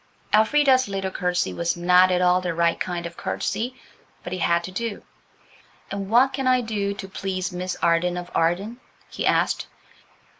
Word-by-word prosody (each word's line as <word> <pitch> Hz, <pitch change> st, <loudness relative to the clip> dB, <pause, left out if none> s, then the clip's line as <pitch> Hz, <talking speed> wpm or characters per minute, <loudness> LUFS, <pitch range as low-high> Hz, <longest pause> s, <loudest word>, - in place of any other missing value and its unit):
Elfrida's 260 Hz, +4 st, +4 dB
little 195 Hz, -1 st, -3 dB
curtsey 180 Hz, -1 st, -1 dB
was 170 Hz, 0 st, -1 dB
not 180 Hz, +1 st, +5 dB
at 180 Hz, 0 st, +1 dB
all 180 Hz, 0 st, +4 dB
the 180 Hz, -2 st, -3 dB
right 170 Hz, 0 st, +1 dB
kind 175 Hz, -1 st, -3 dB
of 170 Hz, 0 st, -7 dB
curtsey, 225 Hz, +10 st, -3 dB, 0.5 s
but 180 Hz, -, -6 dB
it 185 Hz, -, -3 dB
had 170 Hz, 0 st, +2 dB
to 185 Hz, -, -7 dB
do. 225 Hz, +2 st, -4 dB, 0.9 s
"And 195 Hz, -1 st, -4 dB
what 255 Hz, +4 st, +4 dB
can 265 Hz, -1 st, -2 dB
I 255 Hz, -1 st, +4 dB
do 205 Hz, -3 st, -2 dB
to 195 Hz, -1 st, -7 dB
please 190 Hz, -1 st, -3 dB
Miss 180 Hz, 0 st, -3 dB
Arden 170 Hz, +1 st, +2 dB
of 175 Hz, 0 st, -7 dB
Arden?" 195 Hz, +9 st, 0 dB, 0.3 s
he -, -, -2 dB
asked. -, -, +1 dB
185 Hz, 175 wpm, -23 LUFS, 180-220 Hz, 0.9 s, not